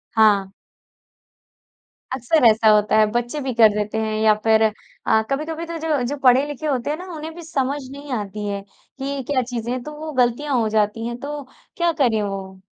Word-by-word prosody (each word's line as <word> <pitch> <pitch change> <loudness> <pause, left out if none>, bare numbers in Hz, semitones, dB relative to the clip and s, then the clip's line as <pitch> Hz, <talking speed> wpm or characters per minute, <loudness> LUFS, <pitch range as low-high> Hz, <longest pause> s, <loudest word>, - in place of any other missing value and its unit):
हाँ। 205 -3 +4 1.6
अक्सर 260 +3 +2
ऐसा 220 0 +5
होता 210 0 +4
है, 215 - +6
बच्चे 240 +5 -2
भी 265 -2 -2
कर 225 -2 +7
देते 210 +1 -2
हैं 220 0 -2
या 220 -1 +5
फिर 220 0 +4
अ, 220 0 0
कभी-कभी 315 +4 -2
तो 335 0 -5
जो 315 -4 0
जो 285 - -2
पढ़े-लिखे 275 +4 +3
होते 265 -2 -1
हैं 300 - -1
ना, 360 - -8
उन्हें 315 +1 -6
भी 345 - -9
समझ 280 -3 -1
नहीं 280 +1 -9
आती 210 +1 -5
है, 200 -1 -3 0.4
कि 275 +1 -3
क्या 275 -3 +1
चीज़ें 240 -1 -4
हैं, 255 0 -2
तो 300 - -7
वो 315 0 -5
गलतियाँ 260 +4 0
हो 225 - +1
जाती 215 +2 0
है, 235 - -4
तो 285 +3 -6 0.3
क्या 345 -1 +2
करें 225 -4 +2
वो? 195 -2 -5
245 Hz, 195 wpm, -21 LUFS, 220-290 Hz, 1.6 s, कर